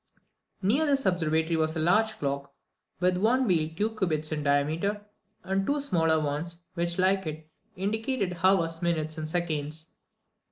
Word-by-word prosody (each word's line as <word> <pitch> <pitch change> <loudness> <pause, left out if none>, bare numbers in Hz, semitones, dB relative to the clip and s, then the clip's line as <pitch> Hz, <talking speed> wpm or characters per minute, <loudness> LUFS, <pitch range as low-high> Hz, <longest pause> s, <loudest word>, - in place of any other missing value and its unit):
Near 265 +11 +3
this 275 -2 +2
observatory 160 -2 +1
was 160 0 0
a - - -1
large 215 +7 +2
clock, 140 0 -3 0.4
with 180 0 +2
one 240 +7 +3
wheel 165 -7 +2
two 215 +4 -1
cubits 155 -7 0
in 155 -1 -1
diameter, 155 +9 0 0.4
and 195 +1 0
two 285 +8 0
smaller 165 - +2
ones, 155 +4 -3
which, 170 -1 -1
like 190 -1 +2
it, 155 0 -6 0.3
indicated 200 -1 -2
hours, 165 -4 +3
minutes, 160 -2 -1
and 155 0 -4
seconds. 155 -2 -2
170 Hz, 150 wpm, -28 LUFS, 155-195 Hz, 0.4 s, Near